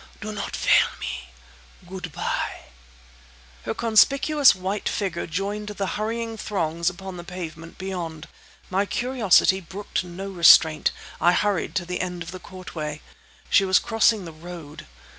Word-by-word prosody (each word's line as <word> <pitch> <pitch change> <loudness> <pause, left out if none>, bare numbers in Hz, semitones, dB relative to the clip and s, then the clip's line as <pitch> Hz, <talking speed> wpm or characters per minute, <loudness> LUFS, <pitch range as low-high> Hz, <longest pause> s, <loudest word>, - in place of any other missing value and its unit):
Do 215 0 -5
not 210 - -4
fail - - +4
me. 60 0 -5 0.6
Good 180 -2 -7
bye!" - - -3 1.0
Her - - -2
conspicuous 275 +5 +5
white 190 +3 -2
figure 190 -5 -2
joined 200 +5 -3
the 205 -1 -3
hurrying 225 +1 -3
throngs 170 -5 -1
upon 190 0 -8
the 175 - -7
pavement 170 -2 -8
beyond. 170 -4 -5 0.4
My 195 +2 +1
curiosity 225 -7 +3
brooked 190 +2 -4
no 185 +3 -7
restraint. 160 -3 +6 0.3
I 175 - +5
hurried 205 -1 0
to 175 - 0
the 180 +1 -3
end 180 -1 -4
of 175 - -8
the 185 - -8
courtway. 160 -6 -7 0.5
She 195 - +4
was 190 -1 +4
crossing 225 -3 +2
the 165 - -7
road. 160 - -10
185 Hz, 140 wpm, -24 LUFS, 170-205 Hz, 1.0 s, restraint